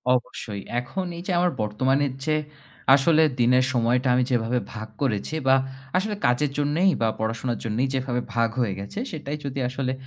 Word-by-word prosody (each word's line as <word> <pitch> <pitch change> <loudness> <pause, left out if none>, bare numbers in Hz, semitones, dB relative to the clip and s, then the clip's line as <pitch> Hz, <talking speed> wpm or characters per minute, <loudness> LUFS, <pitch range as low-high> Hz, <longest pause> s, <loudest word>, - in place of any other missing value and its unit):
অবশ্যই, 105 -4 -4 0.2
এখন 160 +10 -4
এই 170 - -7
যে - - 0
আমার 180 0 +3
বর্তমানের 130 +6 +1
যে 155 - +2 0.6
আসলে 155 +3 +4 0.2
দিনের 125 +1 +4
সময়টা 125 +2 +2
আমি 125 - +3
যেভাবে 120 +1 +1
ভাগ 110 -1 -6
করেছি। 130 +2 -1
বা 135 - +7 0.4
আসলে 210 +2 -1
কাজের 130 +4 +2
জন্যেই 150 +6 +3
বা 115 - +3
পড়াশোনার 115 +2 -2
জন্যেই 115 +4 0
যেভাবে 125 -2 -1
ভাগ 115 -1 +2
হয়ে 110 -5 +1
গেছে 100 - -6
সেটাই 150 -2 -4
যদি 140 -1 -3
আসলে 130 0 -2
130 Hz, 165 wpm, -25 LUFS, 115-145 Hz, 0.6 s, বা